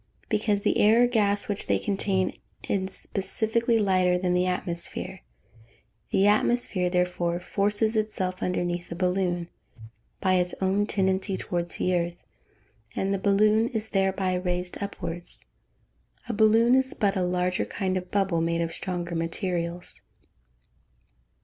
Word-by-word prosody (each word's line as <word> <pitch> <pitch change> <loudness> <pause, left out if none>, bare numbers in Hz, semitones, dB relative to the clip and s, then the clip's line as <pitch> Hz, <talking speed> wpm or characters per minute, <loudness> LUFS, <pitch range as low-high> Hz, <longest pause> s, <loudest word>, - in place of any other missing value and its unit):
_ - - -39
Because 210 -1 +1
the - - +1
air 225 +3 +6
or - - +7
gas 205 -4 +1
which 205 -1 -3
they - - +3
contain 195 -2 0 0.3
is 190 -1 -1
specifically 225 +5 0
lighter 185 -4 +3
than 180 0 0
the 180 +1 +2
atmosphere; 175 -1 -3 0.9
the 195 - +3
atmosphere, 210 -3 +2
therefore, 180 -1 0
forces 205 +4 0
itself 190 -4 -1
underneath 175 -1 -2
the 170 - -5
balloon, 180 -1 0 0.7
by 185 -1 +2
its 180 0 0
own 195 +2 +1
tendency 190 -1 0
towards 175 -1 -3
the 180 - +1
earth, 175 0 -1 0.8
and 195 +1 0
the 195 - -1
balloon 210 +3 +3
is 220 -2 -3
thereby 190 -1 +1
raised 180 0 -2
upwards. 175 -3 -3 0.8
_A 235 - -2
balloon 225 +3 +5
is 265 0 +2
but 200 -1 +1
a 190 - 0
larger 180 0 0
kind 190 -1 -2
of 180 -1 -3
bubble, 195 -4 +1
made 170 0 0
of 165 0 -1
stronger 175 0 -4
materials. 170 +1 -3
190 Hz, 140 wpm, -26 LUFS, 180-205 Hz, 0.9 s, or